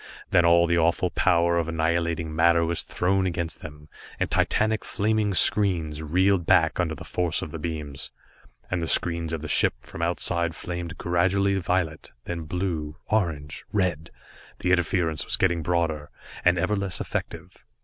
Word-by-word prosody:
Then 85 -1 +5
all 85 0 +5
the 85 0 +2
awful 85 +2 +1
power 85 -1 +2
of 85 - -2
annihilating 80 -1 -1
matter 85 +1 +4
was 85 0 -1
thrown 95 +1 0
against 85 -3 -3
them, 75 0 -10 0.3
and - - -1
titanic 110 0 +1
flaming 105 -1 0
screens 85 -8 +3
reeled 90 +3 +2
back - - +3
under 80 -3 0
the - - -9
force 90 -3 -1
of 75 - -7
the 80 - -6
beams, 75 -3 -4 0.6
and 90 -2 0
the 80 - -2
screens 85 -1 +1
of 80 -2 -4
the - - -4
ships - - +1
from 80 - -8
Outside 85 -1 0
flamed 85 -1 -6
gradually 95 +3 +1
violet, 85 -4 -1 0.2
then 85 -2 -4
blue, 80 -3 -3
orange 75 -9 -1
red 85 -5 -1 0.5
the 90 - -1
interference 85 -3 +1
was - - 0
getting 85 -3 +1
broader, 80 -3 -1 0.3
and 90 0 +4
ever 95 +5 +1
less 100 -2 -2
effective. - - -5
85 Hz, 160 wpm, -25 LUFS, 80-90 Hz, 0.6 s, Then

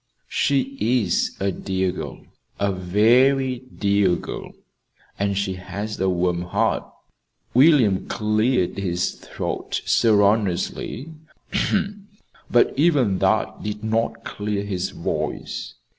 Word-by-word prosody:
"She 135 -1 0
is 110 -5 +1
a 100 0 0
dear 95 0 -1
girl 90 - -7 0.4
a 100 0 +1
very 120 +8 +3
dear 100 -7 +1
girl; - - -7 0.7
and 100 0 0
she 100 -1 0
has 100 +4 -6
a 95 0 +2
warm 90 -1 0
heart." 90 - -1 0.6
William 125 - +5
cleared 110 -2 +1
his 90 -2 -1
throat - - -4
sonorously, 105 - +1 1.4
but 120 - +4
even 135 - +3
that - - +1
did 105 0 -5
not 110 +1 -1
clear 105 -1 -3
his 95 -2 -2
voice. - - -4
105 Hz, 105 wpm, -23 LUFS, 95-120 Hz, 1.4 s, William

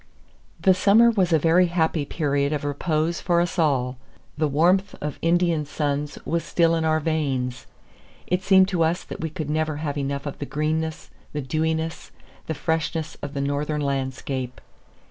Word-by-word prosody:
The 190 - +5
summer 210 +5 +5
was 190 -6 +1
a 160 - +6
very 165 +4 +4
happy 160 -3 0
period 140 -1 0
of 145 - -2
repose 155 +3 -1
for 175 -1 +2
us 175 +1 -1
all. 130 -5 +1 0.4
The 155 0 +1
warmth 180 +7 +2
of 150 -1 -5
Indian 170 -2 +2
suns 145 0 -2
was 165 0 -1
still 165 +1 +2
in 165 -1 +1
our 155 0 +2
veins. 135 -6 -2 0.6
It 180 +1 0
seemed 190 0 +5
to 180 -4 +1
us 165 +3 0
that - - -8
we 160 - -2
could 155 -2 -4
never 155 0 0
have 145 -1 -3
enough 140 0 -3
of 145 - -6
the 145 - -4
greenness, 155 +1 -2 0.2
the 150 - -2
dewiness, 160 +4 -2 0.4
the 160 - -2
freshness 160 +1 -2
of 145 -1 -6
the 140 - -1
northern 145 +2 -1
landscape. 130 -2 -3
155 Hz, 170 wpm, -24 LUFS, 145-170 Hz, 0.6 s, a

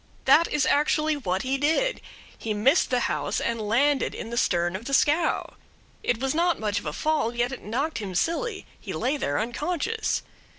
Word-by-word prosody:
That 335 - +6
is 285 -3 +2
actually 305 +1 +2
what 190 -9 -2
he 270 +1 -1
did. 325 - +1 0.3
He 215 -2 -3
missed 265 - +3
the 250 -1 +1
house, - - -1
and 230 -1 -2
landed 265 +7 +1
in 225 - -6
the - - -3
stern 175 -6 +1
of 205 +5 -6
the 275 - +1
scow. 310 +4 +2 0.5
It 235 - 0
was 265 0 0
not 340 +1 +1
much 210 -2 -1
of - - -8
a - - -1
fall, 300 - 0
yet 240 +1 0
it 265 - -7
knocked 260 +9 -2
him 195 -4 -5
silly. 390 - -1
He - - -6
lay 270 +4 0
there 145 - -1
unconscious. 335 - -1
265 Hz, 195 wpm, -26 LUFS, 225-310 Hz, 0.5 s, That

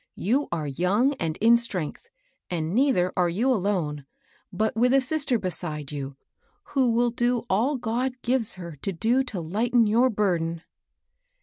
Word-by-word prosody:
You 260 +9 +1
are 160 -3 -2
young 185 - +1
and 160 -1 -2
in 230 +2 +6
strength; 200 - -3 0.4
and 165 -1 -2
neither 235 -8 +2
are 180 -1 +2
you 225 +10 +1
alone, 175 - -2 0.4
but 215 +4 -1
with 250 +3 +3
a - - +6
sister 270 -2 +1
beside 170 -7 -4
you, 140 -2 -6 0.5
who 265 -3 +2
will 235 +1 +2
do 240 0 0
all 245 +9 +2
God 245 +2 -1
gives 240 -3 0
her 170 -4 -8
to 195 - -2
do 235 +10 +2
to 195 -9 -4
Ughten 225 +7 +2
your 235 +5 +3
burden." 170 -6 -1
210 Hz, 160 wpm, -25 LUFS, 170-245 Hz, 0.5 s, in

